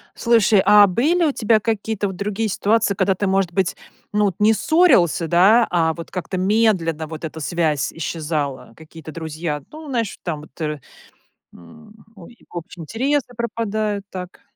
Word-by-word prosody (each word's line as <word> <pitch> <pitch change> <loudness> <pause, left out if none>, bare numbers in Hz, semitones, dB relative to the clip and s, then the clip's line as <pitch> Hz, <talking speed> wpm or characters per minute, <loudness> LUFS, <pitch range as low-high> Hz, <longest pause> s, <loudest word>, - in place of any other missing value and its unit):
Слушай, 225 -4 +3
а 205 0 +8
были 300 - +1
у 295 - +2
тебя 220 -3 +2
какие-то 220 -1 -2
вот 190 - -6
другие 210 +2 -2
ситуации, 210 +1 +1
когда 190 0 +1
ты, 200 - -2
может 190 -2 +1
быть, 185 0 0 0.4
ну 210 0 +2
вот 190 -4 -1
не 215 +2 +5
ссорился, 220 - +3
да, 195 +8 +5
а 165 -2 +2
вот 170 - -9
как-то 185 +1 -4
медленно 185 -6 +1
вот 160 0 -7
эта 160 0 -7
связь 155 -2 -1
исчезала? 150 -4 -4
Какие-то 160 0 -11
друзья, 155 -2 -5
ну 310 0 -10
знаешь, 230 -6 -2
там 155 -4 -4
вот, 155 +2 -15
э, 150 -1 -2 0.7
м, 210 - -16 0.2
о, 185 -5 -13
и 235 - -19
в - - -18
общем 170 0 -8
интересы 265 - -1
пропадают 215 -3 -2
так. 180 -1 -8
195 Hz, 170 wpm, -20 LUFS, 165-220 Hz, 0.7 s, а